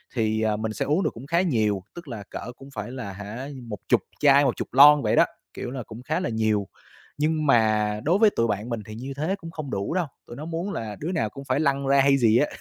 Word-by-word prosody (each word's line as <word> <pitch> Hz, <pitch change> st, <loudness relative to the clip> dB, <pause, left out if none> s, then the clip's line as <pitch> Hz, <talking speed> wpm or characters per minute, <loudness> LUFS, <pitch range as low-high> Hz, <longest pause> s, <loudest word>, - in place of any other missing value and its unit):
thì, 110 Hz, -2 st, +1 dB
à, 110 Hz, -1 st, +1 dB
mình 110 Hz, 0 st, -3 dB
sẽ -, -, -2 dB
uống 155 Hz, +7 st, +1 dB
được 155 Hz, -, +2 dB
cũng 120 Hz, +4 st, -10 dB
khá 170 Hz, +3 st, +2 dB
nhiều, 110 Hz, -, +1 dB
tức 170 Hz, -2 st, -9 dB
là 115 Hz, -6 st, -6 dB
cỡ 120 Hz, -, -6 dB
cũng 135 Hz, -, -13 dB
phải 105 Hz, +2 st, -5 dB
là, 125 Hz, -7 st, -6 dB
hả, 105 Hz, +7 st, -7 dB, 0.2 s
một 105 Hz, -, -5 dB
chục -, -, +4 dB, 0.2 s
chai, 140 Hz, -1 st, +6 dB
một 130 Hz, -, +1 dB
chục -, -, -4 dB
lon 145 Hz, +2 st, +8 dB
vậy 105 Hz, -, +2 dB
đó, -, -, +6 dB, 0.3 s
kiểu 125 Hz, -, -5 dB
là, 130 Hz, -2 st, -5 dB
cũng 110 Hz, +1 st, -10 dB
khá 155 Hz, +5 st, -1 dB
là 180 Hz, -, -2 dB
nhiều. 110 Hz, -3 st, 0 dB, 0.5 s
Nhưng 155 Hz, +1 st, +1 dB
mà 110 Hz, -4 st, +3 dB
đối 175 Hz, +8 st, +2 dB
với 220 Hz, -1 st, +7 dB
tụi 115 Hz, -, 0 dB
bạn 105 Hz, +2 st, -2 dB
mình 115 Hz, -2 st, -2 dB
thì 110 Hz, -, -9 dB
như 130 Hz, +4 st, -6 dB
thế 160 Hz, +6 st, 0 dB
cũng 165 Hz, -4 st, -10 dB
không 155 Hz, -4 st, -6 dB
đủ 100 Hz, +9 st, -2 dB
đâu, 180 Hz, -3 st, +1 dB, 0.2 s
tụi 120 Hz, -, -9 dB
nó 150 Hz, -, -7 dB
muốn 170 Hz, +4 st, -3 dB
là 110 Hz, -2 st, -4 dB
đứa 165 Hz, +5 st, -3 dB
nào 115 Hz, -11 st, 0 dB
cũng 135 Hz, +6 st, -10 dB
phải 140 Hz, -, 0 dB
lăn 140 Hz, -2 st, +1 dB
ra 140 Hz, 0 st, +4 dB
hay 140 Hz, 0 st, +4 dB
gì 115 Hz, -2 st, +4 dB
á. 145 Hz, -, +3 dB
130 Hz, 270 wpm, -25 LUFS, 110-150 Hz, 0.5 s, lon